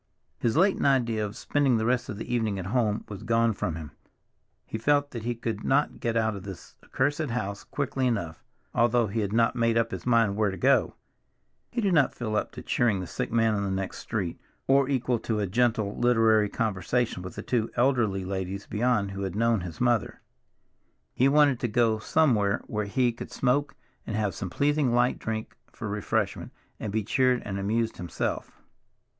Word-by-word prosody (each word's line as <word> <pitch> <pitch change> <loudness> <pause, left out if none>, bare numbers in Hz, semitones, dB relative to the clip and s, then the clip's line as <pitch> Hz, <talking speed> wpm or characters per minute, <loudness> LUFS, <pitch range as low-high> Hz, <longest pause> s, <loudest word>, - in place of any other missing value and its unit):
His 120 +4 0
latent 190 -3 +3
idea 120 -5 +2
of 105 0 -5
spending 140 -4 +1
the 110 - -1
rest 125 +1 0
of 105 - -5
the 115 - -5
evening 110 -4 0
at 95 - -5
home 110 0 0
was 100 -2 -8
gone 115 0 +2
from 85 -4 -3
him—he 80 +6 -12
felt 145 +3 +2
that 115 - -5
he 120 0 -1
could 115 -2 -4
not 145 +2 +1
get 115 -1 -1
out 110 -2 +1
of 100 - -7
this 95 -1 -10
accursed 145 +2 -1
house 100 -4 -3
quickly 135 -2 -2
enough, 85 -9 -2 0.3
although 120 0 +3
he 110 +2 -3
had 100 -2 -1
not 115 +1 +2
made 115 -1 +2
up 115 0 +1
his - - -6
mind 115 -4 +3
where 105 -1 +2
to 95 - -5
go; - - +3 0.7
he 240 - -2
did 195 -4 +1
not 150 -5 +3
feel 110 -3 -3
up - - -1
to - - -8
cheering 115 -5 +1
the 90 - -4
sick 90 - -4
man 115 -1 +3
in 100 -1 -1
the 100 - -1
next 95 0 -3
street, 100 -7 -4 0.2
or 135 0 +3
equal 125 -3 0
to 110 -1 -2
a 105 - +1
gentle 110 0 +1
literary 115 -3 +3
conversation 110 0 -1
with 90 0 -8
the - - -6
two 115 -3 0
elderly 120 -7 +1
ladies 95 +1 -4
beyond 105 -3 0
who 100 0 -5
had 95 -2 -3
known 115 -1 +2
his 85 -2 -7
mother. 120 -4 +1 0.9
He 130 - +3
wanted 145 -3 +4
to 120 - 0
go 115 -1 +2
somewhere 110 -7 +2
where 105 -1 -2
he 120 +4 +1
could 115 - -8
smoke 140 +3 0 0.3
and 110 - -3
have 105 -3 0
some 90 - -5
pleasing 140 - +1
light 120 +1 +2
drink 110 0 -4 0.2
for 110 - -6
refreshment, 105 -1 -2 0.3
and 105 - -4
be 110 +1 0
cheered 125 +2 +2
and 100 -1 -3
amused 110 +3 -1
himself. 90 -3 -4
115 Hz, 195 wpm, -27 LUFS, 100-125 Hz, 0.9 s, wanted